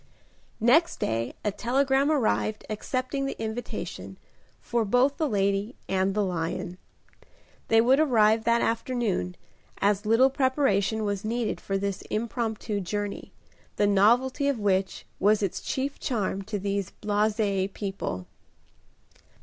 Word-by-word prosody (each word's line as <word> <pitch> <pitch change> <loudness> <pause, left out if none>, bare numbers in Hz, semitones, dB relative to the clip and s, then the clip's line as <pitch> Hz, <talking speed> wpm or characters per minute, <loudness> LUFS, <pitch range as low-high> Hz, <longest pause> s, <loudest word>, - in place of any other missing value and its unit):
Next 285 +10 +3
day 115 +2 -2
a 210 - +2
telegram 270 +6 +1
arrived 220 -6 0
accepting 255 +5 -2
the - - -5
invitation, 225 +2 -5 0.4
for 235 -1 -1
both 250 +6 +2
the 310 -3 0
lady 200 +2 0
and 190 +1 0
the 210 -1 +2
lion. 175 0 -3 0.9
They 225 0 +5
would 260 +4 +4
arrive 220 -7 +4
that 235 0 +3
afternoon, 225 - -1 0.4
as 205 0 +1
little 250 +5 +5
preparation 230 -6 +1
was 200 -1 -2
needed 230 +1 -2
for 195 - -1
this 200 0 -3
impromptu 220 -1 -2
journey, 205 +2 -4 0.4
the 205 - +2
novelty 240 +8 +3
of 280 -3 +1
which 195 -2 0
was 210 +2 +3
its 195 - -2
chief 275 +1 -3
charm 205 -7 -1
to 210 - -1
these 200 -1 -2
blasé 205 -2 +1
people. 190 - -4
215 Hz, 125 wpm, -27 LUFS, 200-245 Hz, 0.9 s, They